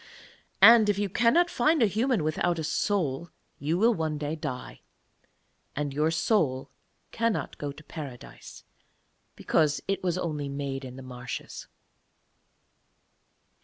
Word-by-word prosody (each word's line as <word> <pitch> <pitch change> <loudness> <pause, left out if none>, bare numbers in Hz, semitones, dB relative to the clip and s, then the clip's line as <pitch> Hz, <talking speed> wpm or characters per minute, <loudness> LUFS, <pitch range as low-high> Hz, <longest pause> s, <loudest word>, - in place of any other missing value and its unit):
And 225 -2 +9
if 205 - +2
you 205 -1 -1
cannot 265 - +3
find 305 +2 +3
a - - +6
human 220 - +1
without 170 +3 0
a 160 - -3
soul 170 -3 -1 0.3
you 155 +4 0
will 230 +5 +4
one 160 -5 -2
day 150 +1 -3
die, 145 -5 -6 0.9
and 145 -1 -2
your 150 +3 +1
soul 160 - 0 0.4
cannot 230 -2 -2
go 145 -1 -3
to 150 +2 -13
Paradise, 140 -7 -10 0.7
because 150 -3 +1
it 195 -1 -1
was 180 -1 0
only 150 -5 -3
made 140 -1 -4
in 130 -1 -8
the 135 - -9
marshes.' 125 -1 -7
160 Hz, 130 wpm, -27 LUFS, 140-205 Hz, 0.9 s, And